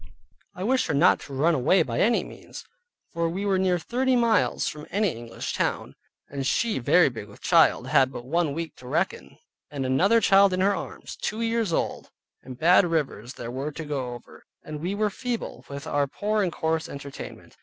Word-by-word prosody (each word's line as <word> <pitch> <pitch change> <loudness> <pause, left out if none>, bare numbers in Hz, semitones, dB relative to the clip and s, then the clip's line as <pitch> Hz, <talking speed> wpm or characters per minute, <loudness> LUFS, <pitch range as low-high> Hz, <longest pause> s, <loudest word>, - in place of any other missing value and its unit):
I 180 - -5
wished 255 +5 +1
her 155 - 0
not 160 +6 +5
to 140 - -10
run 160 +6 +3
away 155 +7 +3
by 120 -2 -3
any 235 +3 +3
means, - - -11 0.5
for 170 0 0
we 190 +4 -3
were 195 -2 +2
near 185 -1 +2
thirty 255 +8 0
miles 230 -4 +2
from 150 0 -6
any 205 +2 +1
English 115 -2 -6
town, - - -2 0.3
and 140 -1 -5
she 220 - 0
very 175 +8 +5
big 115 -6 -6
with 100 - -15
child, - - +4
and - - -7
had 130 -1 +4
but 120 - -8
one 155 +1 0
week 165 -2 -5
to 125 - -12
reckon, - - -2 0.3
and 140 -2 -4
another 190 - +4
child 195 -2 +5
in 185 - 0
her 200 +2 +3
arms, - - -7
two 220 +2 -3
years 230 -4 0
old, - - -2 0.3
and 130 -1 -10
bad 175 +7 +5
rivers 145 - -2
there 120 0 -6
were 135 +4 -4
to 160 +1 -6
go 130 -4 -3
over, 120 - -14 0.2
and 150 -1 -7
we 185 +4 -2
were 210 0 0
feeble, 240 +2 -5
with 140 0 -7
our 145 -1 0
poor 210 +8 -1
and 185 -3 0
coarse 160 0 -1
entertainment. 140 0 -9
165 Hz, 205 wpm, -25 LUFS, 135-200 Hz, 0.5 s, not